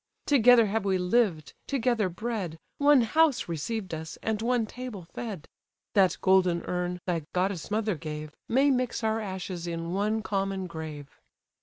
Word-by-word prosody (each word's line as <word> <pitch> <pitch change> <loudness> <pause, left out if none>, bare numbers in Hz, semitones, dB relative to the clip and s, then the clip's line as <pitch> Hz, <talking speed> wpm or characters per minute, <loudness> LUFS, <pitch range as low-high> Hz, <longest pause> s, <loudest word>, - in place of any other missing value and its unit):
Together 245 -4 +6
have 210 +1 -1
we 195 -2 +1
lived; 180 -4 +1
together 240 -7 +1
bred, 190 -4 -4 0.2
One 285 -2 +6
house 300 +4 +3
received 185 +4 -3
us, 160 0 -6
and 220 -1 -1
one 240 0 +1
table 240 -4 -7
fed; 205 -9 -6 0.5
That 195 -3 +4
golden 185 -3 +3
urn, 180 0 -2
thy 175 -3 0
goddess 185 -2 -1
mother 215 0 0
gave, 155 -1 -6 0.2
May 275 +4 +4
mix 250 -3 -1
our 220 0 +1
ashes 185 -4 -5
in 170 0 -3
one 210 +3 0
common 195 -2 -1
grave." 155 -4 -8
195 Hz, 150 wpm, -28 LUFS, 175-230 Hz, 0.5 s, Together